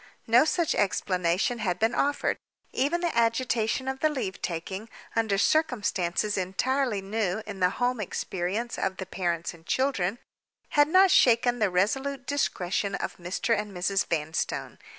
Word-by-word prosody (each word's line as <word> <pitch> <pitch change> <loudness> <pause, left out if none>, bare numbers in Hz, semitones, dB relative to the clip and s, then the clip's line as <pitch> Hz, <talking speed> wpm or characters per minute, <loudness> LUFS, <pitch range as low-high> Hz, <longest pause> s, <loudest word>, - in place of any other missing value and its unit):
No 240 +5 +5
such 335 0 +1
explanation 185 +2 0
had 180 -5 -1
been 225 +4 +1
offered. 285 +1 0 0.4
Even 300 +7 +1
the 345 -6 -1
agitation 230 +1 +1
of 265 0 -2
the 310 - +3
leave 255 -10 -4
taking, 190 +6 -4 0.3
under 220 -3 +1
circumstances 205 - +1
entirely 215 +4 0
new 210 0 -1
in 205 -2 -7
the 180 -1 +4
home 245 -1 0
experience 200 +3 -3
of 190 -1 -1
the 190 - -5
parents 175 -3 -2
and 165 -1 -16
children, 235 -3 0 0.5
had 290 0 +4
not 375 +3 +5
shaken 245 0 +4
the 210 -3 +3
resolute 265 +10 0
discretion 200 -8 -1
of - - -4
Mr. 180 +6 -1
and 210 -1 -4
Mrs. 195 +2 +1
Vanstone. 160 -1 -2
215 Hz, 150 wpm, -27 LUFS, 185-260 Hz, 0.5 s, No